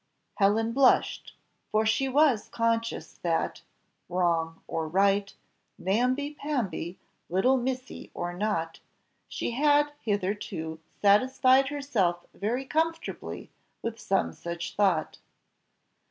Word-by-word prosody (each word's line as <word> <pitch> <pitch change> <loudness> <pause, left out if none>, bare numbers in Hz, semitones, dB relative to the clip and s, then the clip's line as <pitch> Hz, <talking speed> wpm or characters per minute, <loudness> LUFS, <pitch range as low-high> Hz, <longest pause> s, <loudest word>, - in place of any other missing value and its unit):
'" - - -49
Helen 215 +3 +3
blushed, 265 0 +3 0.4
for 215 +1 +2
she 265 +5 +2
was 270 -5 +3
conscious 230 0 -1
that, 165 -2 -1 0.5
wrong 170 -2 0
or 160 -1 -2
right, 195 +3 +2 0.5
namby 250 +9 +1
pamby, 240 - -3 0.3
little 190 +10 +3
missy, 255 0 -4
or 175 0 -3
not, 175 -4 -2 0.5
she - - -3
had 290 +3 +3
hitherto 190 -6 -2 0.2
satisfied 255 +6 +5
herself 225 -12 0
very 240 +6 -2
comfortably 325 +3 -2 0.3
with 230 0 -4
some 195 -2 0
such 170 0 -6
thought. 190 -6 +1
215 Hz, 105 wpm, -28 LUFS, 180-260 Hz, 0.5 s, satisfied